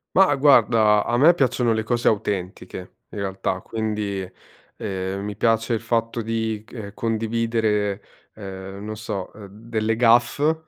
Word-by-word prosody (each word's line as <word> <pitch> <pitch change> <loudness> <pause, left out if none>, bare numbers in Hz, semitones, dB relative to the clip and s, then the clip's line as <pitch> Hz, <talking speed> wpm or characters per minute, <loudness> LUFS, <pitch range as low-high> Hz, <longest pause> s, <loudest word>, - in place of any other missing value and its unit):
Ma 185 -6 +5
guarda 115 -6 +5
a 120 - 0
me 155 +7 +7
piacciono 125 -6 +1
le 110 - 0
cose 120 +2 -1
autentiche 95 -3 -2 0.2
in - - -7
realtà, 95 -1 -2
quindi, 105 -3 -3 0.5
ehm, 95 0 -4
mi 105 0 -5
piace 115 +2 +1
il 115 - 0
fatto 115 0 -1
di 110 -1 -2
c - - -19
ehm, 105 -4 -7
condividere, 110 -2 0 0.4
ehm, 95 -1 -8
non 110 0 -5
so, 105 -3 -5
ehm, 105 -1 -11
delle 110 +2 -2
gaffe 120 +7 +3
110 Hz, 145 wpm, -23 LUFS, 100-115 Hz, 0.5 s, me